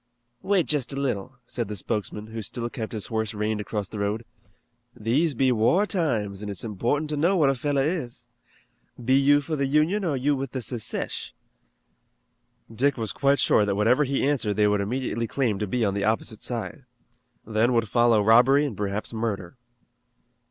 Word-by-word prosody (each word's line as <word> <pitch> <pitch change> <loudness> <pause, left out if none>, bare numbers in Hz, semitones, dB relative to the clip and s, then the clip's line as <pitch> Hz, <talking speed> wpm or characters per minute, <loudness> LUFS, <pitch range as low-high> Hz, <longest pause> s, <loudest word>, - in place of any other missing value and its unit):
"Wait 195 -5 +2
just 145 -5 0
a - - -4
little," 130 -2 -2
said 120 -2 -3
the 105 - -5
spokesman, 105 +1 -3
who 110 +1 -6
still 115 +3 -3
kept 110 -5 -5
his 110 -3 -4
horse 110 -1 -2
reined 105 0 -1
across 105 -1 -3
the 105 - -7
road. 105 +3 -2 0.7
"These 135 +8 +1
be 130 +1 +3
war 125 - +3
times 115 - -1
an' 105 - -5
it's 100 - -3
important 120 +8 -1
to - - 0
know 175 +6 +3
what 145 -5 +4
a - - +1
fellow 140 +1 0
is. 130 -7 -3 0.8
Be 130 - +3
you 140 +2 +5
for 155 +2 -3
the 140 -2 0
Union 155 +9 +2
or 165 -5 0
are - - -1
you 140 +3 +1
with 135 -1 -5
the 130 -2 -3
Secesh?" 115 -1 -4 1.4
Dick 135 +4 +1
was 110 -3 -3
quite 140 +1 +2
sure 105 - +4
that 100 -1 0
whatever 115 +8 +3
he 135 0 0
answered 115 -8 0
they 105 -1 +3
would 105 -1 +2
immediately 115 +1 -2
claim 115 -6 0
to 105 - -2
be 115 +3 0
on 100 - 0
the 100 0 -2
opposite 110 0 -1
side. 120 +4 -5 0.6
Then 110 +2 +2
would 115 -2 +2
follow 120 -1 +3
robbery 125 +7 +5
and 135 -7 -4
perhaps 100 +3 -3
murder. 110 -3 -3
120 Hz, 190 wpm, -25 LUFS, 105-140 Hz, 1.4 s, you